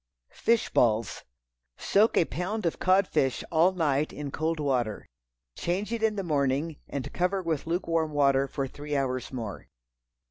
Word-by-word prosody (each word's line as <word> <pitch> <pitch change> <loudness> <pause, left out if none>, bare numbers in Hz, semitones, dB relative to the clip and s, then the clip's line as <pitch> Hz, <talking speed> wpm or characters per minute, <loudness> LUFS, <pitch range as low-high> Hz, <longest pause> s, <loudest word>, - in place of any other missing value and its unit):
Fish 230 -1 +1
Balls. 115 -1 +1 0.5
Soak 215 +3 +3
a - - +5
pound 185 +6 -3
of 170 - -1
cod 190 +1 +4
fish 135 -2 0
all 170 +3 +4
night 155 -5 0
in 145 -1 -6
cold 160 +2 -1
water. 125 -7 -1 0.5
Change 195 +6 -2
it 230 - -2
in 220 -1 +2
the 195 - -2
morning, 145 -1 0
and 140 -1 -5
cover 185 +2 0
with 160 -3 -2
lukewarm 165 -2 0
water 140 -2 +3
for 135 +1 -3
three 145 +2 -5
hours 130 -3 -1
more. 115 -6 -6
155 Hz, 155 wpm, -28 LUFS, 135-180 Hz, 0.5 s, a